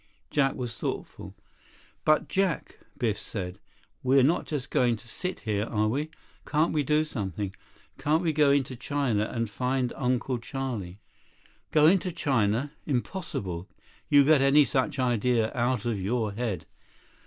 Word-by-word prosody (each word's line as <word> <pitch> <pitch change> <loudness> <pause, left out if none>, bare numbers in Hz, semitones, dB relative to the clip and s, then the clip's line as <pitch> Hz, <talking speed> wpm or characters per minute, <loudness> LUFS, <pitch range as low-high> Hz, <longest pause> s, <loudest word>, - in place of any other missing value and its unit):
Jack 135 -2 +2
was 120 -3 -5
thoughtful. - - -5 0.7
"But 155 0 +4
Jack," 190 -3 -1 0.2
Biff 110 -5 0
said, 95 -3 -5 0.4
"we're 130 +1 +4
not 160 +6 +2
just 145 -4 -4
going 120 -2 +3
to 115 +2 -14
sit 180 - -4
here, 105 -2 -1
are 110 -1 0
we? 145 +8 -1 0.3
Can't 155 +2 +1
we 150 - +2
do 150 +2 +2
something? 100 - -4 0.5
Can't 155 +4 +2
we 160 -2 +1
go 150 -1 +4
into 140 -2 +2
China 125 -5 0
and 115 -1 -1
find 125 +3 -1
Uncle 125 0 0
Charlie?" 115 -8 -5 0.7
"Go 150 -1 +4
into 185 +2 +4
China? 130 -3 +1 0.2
Impossible. 110 - -3 0.4
You 145 -1 +7
get 150 0 +5
any 140 +2 +6
such 130 0 0
idea 120 -2 +1
out 120 -2 0
of 110 -5 -1
your 110 +2 0
head." 110 -2 -3
125 Hz, 145 wpm, -28 LUFS, 110-145 Hz, 0.7 s, You